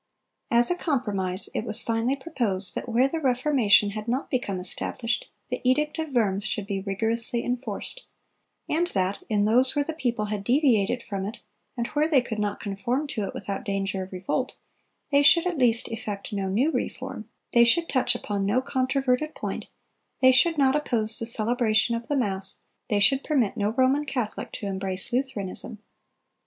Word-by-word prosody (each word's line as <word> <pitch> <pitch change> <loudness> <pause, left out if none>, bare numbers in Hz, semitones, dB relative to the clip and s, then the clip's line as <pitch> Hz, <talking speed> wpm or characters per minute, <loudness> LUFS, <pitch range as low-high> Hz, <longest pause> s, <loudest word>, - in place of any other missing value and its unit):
As 235 +3 +6
a - - +2
compromise 205 - 0
it - - -2
was 220 0 +3
finally 230 +3 0
proposed 235 - -1
that - - -5
where 240 +3 +3
the 325 +4 -3
Reformation 250 -6 +3
had 215 +1 -6
not 255 +4 -2
become 205 -8 -1
established, 230 +5 -2 0.2
the 250 - -3
edict 300 +5 +1
of 315 -1 -2
Worms 205 -6 +1
should 210 -1 -1
be 195 -1 -3
rigorously 225 +4 -1
enforced; 245 - -4 0.6
and 340 +3 +1
that 190 - -1
"in 205 -2 +2
those 250 +6 +3
where 290 -1 +1
the 320 - -4
people 240 -8 -1
had 210 -1 -4
deviated 245 -3 +2
from 195 -2 -4
it, 210 +4 -6 0.4
and 235 - -1
where 300 +1 +1
they 300 -4 +4
could 220 -3 -5
not 205 -1 -2
conform 225 +8 -2
to 215 -6 -2
it - - -6
without 200 +3 -4
danger 195 -3 -2
of 185 - -7
revolt, 190 +8 -3 0.6
they 280 0 +5
should 335 +4 +5
at 355 -5 -1
least 240 -1 +3
effect 215 -3 -5
no 195 -2 -2
new 250 +11 +2
reform, - - -4 0.2
they 235 - +7
should 330 +8 +3
touch 250 -2 +2
upon 205 -4 -3
no 205 +6 +2
controverted 260 +2 0
point, - - -5 0.5
they 260 0 +6
should 315 +6 +3
not 270 -1 +3
oppose 225 -7 +1
the 230 - -2
celebration 230 0 +2
of 230 0 -4
the 290 - 0
mass, 195 -5 -2 0.3
they 205 - +2
should 265 +7 +4
permit 255 -10 +1
no 205 -2 0
Roman 260 +5 +2
Catholic 250 -6 -4
to - - -6
embrace 190 +2 0
Lutheranism." 240 -4 -3
235 Hz, 180 wpm, -25 LUFS, 205-265 Hz, 0.6 s, they